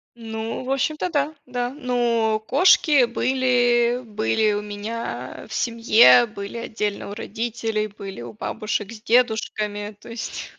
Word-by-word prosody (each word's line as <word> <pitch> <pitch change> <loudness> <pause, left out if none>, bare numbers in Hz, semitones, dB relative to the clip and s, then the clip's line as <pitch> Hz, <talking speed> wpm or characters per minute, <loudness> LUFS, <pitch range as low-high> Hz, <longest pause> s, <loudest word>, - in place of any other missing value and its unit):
Ну, 225 0 -5
в 260 - -4
общем-то, 305 +6 0
да, 300 -1 -1
да. 245 -1 -2
Но 240 -5 0
кошки 295 -3 +5
были 245 -1 +2
были 210 - 0
у 205 - -1
меня 205 - -6
в 220 - -9
семье, 235 +1 +5
были 200 -1 -7
отдельно 210 -3 -3
у - - -5
родителей, 220 0 -3
были 195 - -9
у 120 -1 -8
бабушек 210 - -3
с 220 -2 -10
дедушками, 215 -3 0
то - - -12
есть 230 0 -6
230 Hz, 135 wpm, -23 LUFS, 210-245 Hz, -, кошки